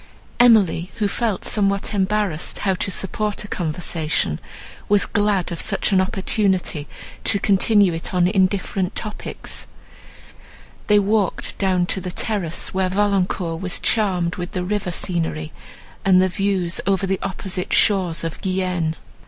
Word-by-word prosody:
Emily, 205 -7 +4
who 210 - 0
felt 215 -1 -1
somewhat 200 0 +1
embarrassed 195 -4 0
how 195 - +3
to 185 - -2
support 205 +2 -2
a - - -8
conversation, 160 - -1 0.5
was 205 0 +4
glad 205 -4 +1
of 170 - -2
such 205 0 0
an 190 -1 +4
opportunity 190 -5 0 0.4
to 200 - +2
continue 200 -1 +3
it 165 - -4
on 180 -2 +3
indifferent 190 0 0
topics. 215 -1 -5 1.2
They 210 - +5
walked 205 -2 +1
down 185 -2 +2
to 190 +1 -1
the 180 - -4
terrace, 180 -3 -2
where 190 0 +1
Valancourt 185 -4 0
was 185 -1 -2
charmed 180 -5 +1
with 180 +2 -5
the 180 -2 -2
river 200 0 -2
scenery, 165 -3 -2 0.5
and 185 -1 +5
the 185 0 +3
views 185 -2 -1
over 195 0 +2
the 190 0 -1
opposite 190 -1 -4
shores 180 -6 +3
of 165 -1 -5
Guienne. 185 -4 -1
190 Hz, 140 wpm, -21 LUFS, 180-200 Hz, 1.2 s, They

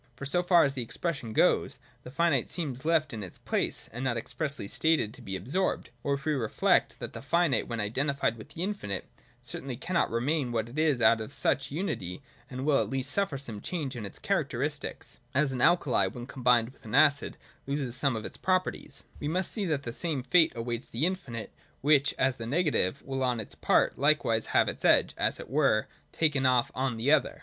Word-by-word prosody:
For, 140 - -7
so 175 +6 +2
far 175 -1 +5
as 140 - +1
the 130 - -2
expression 125 0 -4
goes, - - +2 0.2
the - - -10
finite 145 -2 +1
seems 140 -6 -4
left 155 -3 +2
in 110 - -5
its 95 -3 -8
place, - - -1
— - - -24
it 120 - -6
is - - -3
not 125 -3 0
expressly 140 -1 -3
stated 160 -5 +2
to - - -11
be 95 - -4
absorbed. 140 - -2
Or, 140 - +1
if 140 - -9
we 155 - +1
reflect 120 -6 +1
that - - -7
the - - -7
finite, 170 +1 +1
when 115 -1 -4
identified 120 +2 0
with 110 - -12
the 165 - -4
infinite, 185 - -3 0.4
certainly 130 -3 -6
cannot 170 +4 0
remain 130 +3 0
what 115 -1 -1
it 120 - -11 0.2
was 125 -4 -1
out 115 -1 +5
of 110 - -6
such 140 - +1
unity, 140 - -4 0.3
and 130 0 -5
will 150 -2 +4
at - - -3
least 135 +1 -2
suffer 195 -8 0
some 115 -7 -4
change 150 -7 -4
in 115 - -5
its 100 - -7
charac - - 0
teristics - - -4
( - - -37
— - - -34
as 140 0 +3
an 125 -2 -3
alkali, 140 - +4
when 120 +5 -7
combined 125 -3 +2
with - - -25
an 110 +2 -4
acid, 145 -1 +4 0.3
loses 140 -3 -2
some 135 -2 +1
of 110 - -5
its - - -5
properties), 185 0 -1 0.2
we 145 - -3
must 180 +4 -1
see 210 -3 -1
that 150 -5 -1
the 120 - -5
same 150 -3 -1
fate 165 +3 +5
awaits 120 +1 -4
the 125 +8 0
infinite, 140 -12 -4 0.3
which, 145 0 +3
as 130 0 +1
the 115 - -6
negative, 140 - +1
will 135 -1 -4
on 125 -2 +1
its 110 - -6
part - - +2
likewise 140 -6 +2
have - - +3
its - - -4
edge, - - +4
as - - 0
it - - -8
were, 130 -5 +2 0.3
taken 150 -4 +1
off 125 -2 +2
on 130 -3 -1
the 120 +6 +1
other. 155 -2 +2
135 Hz, 220 wpm, -29 LUFS, 115-155 Hz, 0.4 s, far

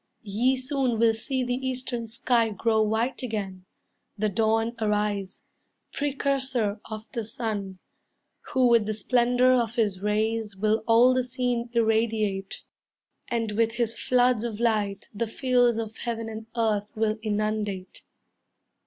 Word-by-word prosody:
Ye 235 +6 +1
soon 260 -2 0
will 225 0 +4
see 260 +4 -2
the 245 0 -1
eastern 255 -2 -3
sky 230 0 +2
Grow 220 +2 +1
white 220 +4 0
again, 200 -6 -4 0.5
the 215 +1 +1
dawn 225 +3 +1
arise, 210 -2 -1 0.5
Precursor 265 -6 -1
of 215 0 -6
the 235 -3 -3
sun, 210 -4 -4 0.7
Who 260 -1 +3
with 230 -3 +4
the 215 - -1
splendor 245 +3 +3
of 235 -2 +1
his 205 -5 +1
rays 215 0 -1
Will 215 +2 +1
all 235 +3 +6
the 255 0 +1
scene 245 -1 -2
irradiate, 220 -4 0 0.6
And 230 -2 -1
with 225 +2 +1
his 235 -1 -1
floods 250 -3 +2
of 225 -3 -4
light 210 -4 0
The 225 +2 -2
fields 245 -1 +2
of 220 -1 -4
heaven 230 -1 -4
and 220 0 -7
earth 215 -3 +1
will 215 0 0
inundate. 210 -3 -2
225 Hz, 135 wpm, -26 LUFS, 215-245 Hz, 0.7 s, all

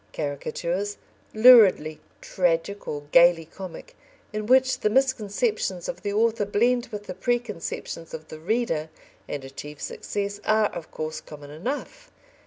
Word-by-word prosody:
Caricatures, 170 +7 -3 0.3
luridly 215 -10 +6 0.2
tragic 180 +3 -1
or 145 -1 -4
gaily 170 -1 +6
comic, 190 - -10 0.4
in 215 0 -3
which 260 +1 +4
the 215 - +1
misconceptions 215 -6 0
of - - -5
the 205 - -2
author 225 +1 +2
blend 235 +4 +1
with 210 -1 -7
the 185 - -6
preconceptions 210 -6 -3
of 155 -1 -8
the 155 - -9
reader 165 -4 -1 0.4
and 140 -2 -5
achieve 145 +2 -9
success, 205 0 -4
are, 215 -1 +3
of 170 -2 -8
course, 155 0 -5
common 145 -1 -11
enough. 285 - -5
200 Hz, 135 wpm, -25 LUFS, 160-225 Hz, 0.4 s, luridly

